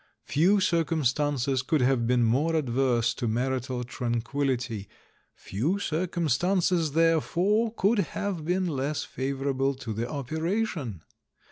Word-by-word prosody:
Few 180 +8 +3
circumstances 145 -6 +1
could 155 +1 +1
have 125 -2 +2
been 125 0 +3
more 140 +9 +2
adverse 120 -4 +1
to 120 - -3
marital 125 +2 -1
tranquil 120 +3 -2
lity: 120 -6 -2 0.5
few 140 - -2
circumstances 175 -1 0
therefore 175 +7 +2
could 210 +2 +2
have 200 -4 -2
been 180 +4 0
less 145 -2 -2
favourable 135 0 -1
to 120 -4 -5
the 115 +3 -3
operation. 155 - -2
140 Hz, 115 wpm, -27 LUFS, 125-170 Hz, 0.5 s, Few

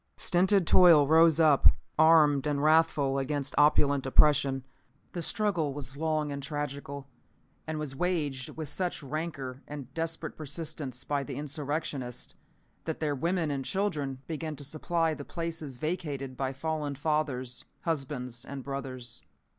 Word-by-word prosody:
Stinted 190 +1 +3
toil 165 -4 +7
rose 160 +1 +5
up, 155 -4 +6 0.3
armed 155 -3 +5
and 145 -1 0
wrathful, 155 -3 +3
against 140 0 -2
opulent 145 -2 +4
oppression. 135 -1 +4 0.5
The 175 - -3
struggle 175 -7 0
was 135 -2 -6
long 155 -1 -1
and 140 0 -4
tragical, 140 -1 -5 0.6
and 155 0 -3
was 150 -3 -4
waged 145 -6 -1
with 155 -2 -4
such 175 +2 -3
rancor 140 -3 -5
and 140 -3 -8
desperate 165 +1 -3
persistence 145 -4 -5
by 145 -1 -1
the 135 -1 -6
insurrectionists, 145 -3 -4 0.5
that 160 - -3
their 150 -2 0
women 165 +2 0
and 135 -1 -2
children 145 -8 -2
began 160 -1 -4
to 145 - -9
supply 160 +3 0
the 145 - -7
places 165 -5 -5
vacated 145 -4 -3
by 135 0 -2
fallen 150 +1 -3
fathers, 140 -4 -2 0.2
husbands 130 -6 -3
and 135 -1 -7
brothers. 130 -3 -6
145 Hz, 140 wpm, -29 LUFS, 135-160 Hz, 0.6 s, toil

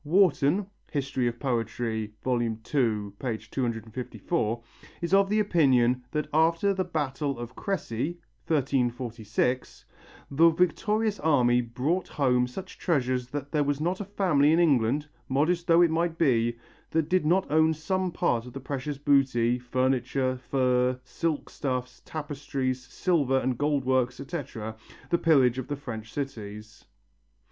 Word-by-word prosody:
Warton 175 +1 +3 0.2
(Hist. 140 -1 -3
of 120 -2 0
Poetry, 115 -4 -2
II, 120 -3 0
254) 115 - -2 0.4
is 170 +1 -3
of 195 0 +5
the 215 +1 +2
opinion 130 - +3
that 150 +3 -2
after 165 +5 +3
the 190 -1 0
battle 145 -5 -2
of 120 +1 -7
Cressy 170 - -3 0.3
(1346) 125 -4 -1 0.5
the 165 +4 +6
victorious 210 +6 +1
army 125 -6 +3
brought 130 +10 -1
home 125 -3 +2
such 185 +10 -9
treasures 130 -7 0
that 140 +1 -5
there 150 -2 +2
was 145 0 -1
not 175 +5 -1
a - - -4
family 175 -7 +3
in 160 - +4
England, 145 -3 +2 0.2
modest 170 +6 +1
though 170 0 +6
it 170 - +3
might 165 0 0
be, 120 -6 +2 0.3
that 160 -2 0
did 185 -2 +2
not 180 +5 +3
own 160 +1 +4
some 185 +4 -1
part 120 -6 0
of 125 - -10
the 135 - -5
precious 140 +1 -4
booty, 130 -4 +2
furniture, 130 +1 0
furs, 125 -1 +2
silk 155 +4 -2
stuffs, 125 -2 -4
tapestries, 140 -4 -3
silver 145 -8 +1
and 130 -2 -1
gold 145 -2 +1
works, 130 -1 +1
etc., 130 -7 -5 0.4
the 170 - +3
pillage 130 -6 +4
of 130 - -5
the 145 - -2
French 115 -6 -7
cities. 110 -6 -7
135 Hz, 135 wpm, -27 LUFS, 125-160 Hz, 0.5 s, the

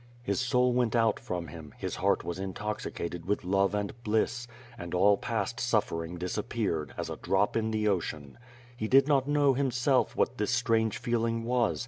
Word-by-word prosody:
His 125 - -1
soul 125 0 +2
went 120 -2 +1
out 115 -2 +3
from 85 -3 -4
him, 75 -1 -10
his - - -4
heart - - +1
was 85 +1 -4
intoxicated 95 -3 -4
with 105 - 0
love 100 +2 +2
and 105 -1 -2
bliss; 115 +3 0 0.3
and 85 -5 -6
all 100 +3 +5
past 115 +1 -3
suffering 90 -8 -1
disappeared, 90 - -2
as - - -4
a - - -5
drop 95 +1 +1
in 110 -1 +1
the 110 -1 0
ocean. 80 - -2 0.4
He 110 -2 -3
did 135 +4 +5
not 140 -2 +3
know, 145 -2 +3
himself, 130 0 +1
what 125 - 0
this 105 - 0
strange 115 -3 +1
feeling 115 -1 -1
was. 120 -1 +1
110 Hz, 175 wpm, -29 LUFS, 95-120 Hz, 0.4 s, all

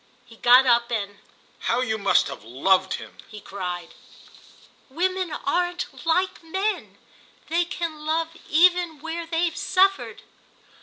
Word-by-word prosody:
He 230 -2 -17
got 250 +3 +6
up 235 -1 +3
and 205 -3 -3 0.4
"How 240 +2 0
you 220 -3 -1
must 200 - +3
have 140 -6 -8
loved 185 - +1
him!" - - -11
he 215 - -10
cried. 180 -4 -6 1.0
"Women 370 +4 -1
aren't 350 +3 -2
like 365 +3 +1
men. 385 +6 -3 0.5
They 340 +2 +2
can 330 -3 -5
love 320 +1 0 0.2
even 345 -1 +3
where 325 +2 -5
they've 330 0 0
suffered." 385 +1 +1
315 Hz, 125 wpm, -24 LUFS, 220-350 Hz, 1.0 s, got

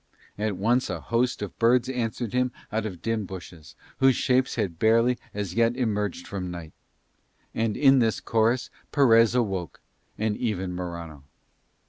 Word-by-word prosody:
At 105 -2 -2
once 120 +6 +1
a - - -3
host 120 -1 0
of 100 - -8
birds 120 +2 +4
answered 120 -3 -3
him 125 0 +1 0.2
out 110 0 -1
of 90 -5 -9
dim 115 -3 -1
bushes, 85 -6 -10 0.2
whose 135 -1 +5
shapes 130 0 +1
had 95 -8 -2
barely 115 +2 +3
as 100 -3 -4
yet 115 +3 +2
emerged 105 -7 -1
from 95 -2 -4
night. 85 -3 -8 0.8
And 115 -2 -1
in 135 -2 +6
this 115 -2 +1
chorus 115 +2 +1 0.2
Perez 115 -5 +5
awoke, 95 - -1 0.4
and 110 -1 0
even 95 -7 -2
Morano. 85 -5 -6
110 Hz, 150 wpm, -26 LUFS, 95-120 Hz, 0.8 s, in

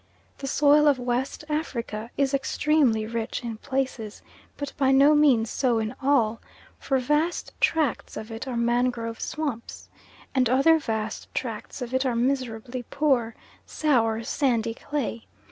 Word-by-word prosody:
The 275 - -5
soil 295 +2 +4
of 285 -3 +4
West 250 +4 -2
Africa 235 -8 -3
is 275 -1 +1
extremely 275 -4 +2
rich 230 +2 -4
in 230 -2 -5
places, 260 -4 -3 0.3
but 285 -1 -5
by 270 -2 +2
no 275 +3 +6
means 265 -7 +4
so 250 -4 +1
in 220 +1 -2
all, 240 -5 +2 0.4
for 270 - 0
vast 300 +6 0
tracts 310 -6 +1
of 220 +1 -7
it 225 +4 -6
are 250 -2 -3
mangrove 235 -1 0
swamps, 285 -7 -5 0.4
and 255 -3 +2
other 275 +6 +5
vast 220 -5 -4
tracts 230 0 -4
of 245 +1 -7
it 260 0 +2
are 255 -3 0
miserably 245 -1 -1
poor, 260 -6 +1 0.3
sour, 230 -7 +1
sandy 230 -3 0
clay. 235 -3 -4
255 Hz, 145 wpm, -25 LUFS, 230-280 Hz, 0.4 s, no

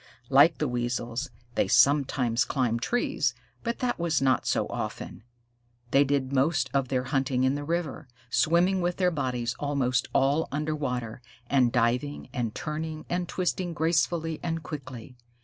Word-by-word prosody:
Like 145 +5 +6
the 150 - 0
Weasels, 120 -1 -2 0.2
they - - +1
sometimes 130 -2 +3
climbed 120 -4 0
trees, 245 - 0 0.3
but 235 0 -2
that 245 -6 0
was 170 -2 +1
not 135 -1 +2
often. - - -4 0.7
They 140 - +6
did 140 -1 -1
most 150 +4 +2
of 135 -2 +1
their 125 -1 0
hunting 135 -1 0
in 130 +1 +3
the 145 0 -3
river, 165 -3 -3 0.2
swimming 180 +6 +3
with 175 0 -1
their 180 -1 +2
bodies 125 -6 -2
almost 135 -3 0
all 140 +4 +2
under 150 +2 -1
water, 125 -5 -3 0.3
and 130 -4 +4
diving 125 +5 0
and 115 -3 -2
turning 155 0 -4
and 175 0 -1
twisting 180 -1 -2
gracefully 165 0 0
and 165 -1 -3
quickly. 130 -5 -8
140 Hz, 150 wpm, -27 LUFS, 125-160 Hz, 0.7 s, Like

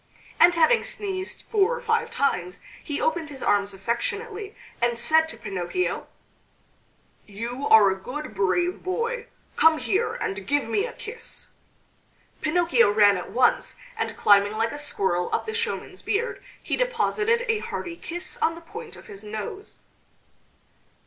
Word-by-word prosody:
And 350 0 +7
having 335 +8 +4
sneezed 380 -2 -4
four 435 +2 +2
or - - -5
five 465 0 0
times, 180 - -1 0.2
he 290 - -3
opened 345 -11 0
his 275 -2 -8
arms 200 0 +2
affectionately, 400 - -3 0.3
and 240 0 +2
said 320 +6 +3
to - - -7
Pinocchio: 195 - -2 1.2
"You 235 +6 -4
are 210 -3 +7
a 190 - -4
good 295 +3 -6
brave 215 - +1
boy! 465 +5 -2 0.3
Come 320 0 +5
here 405 +7 0
and 195 0 -4
give 290 -3 +1
me 400 - +1
a - - -9
kiss." 460 0 -6 0.9
Pinocchio 305 -8 +3
ran 205 -1 +5
at 180 - -5
once, 250 0 +2 0.2
and 450 - -3
climbing 205 0 +5
like 225 +1 0
a - - -5
squirrel 190 -11 0
up - - 0
the 440 - -4
showman's 465 +1 -3
beard 465 +4 -1 0.2
he - - 0
deposited 470 -1 +1
a 450 -2 +2
hearty 350 -4 -5
kiss 345 +1 -6
on 330 +1 +2
the 335 - -11
point 440 +7 -9
of - - -13
his 200 0 -10
nose. 215 - -7
320 Hz, 150 wpm, -25 LUFS, -, 1.2 s, And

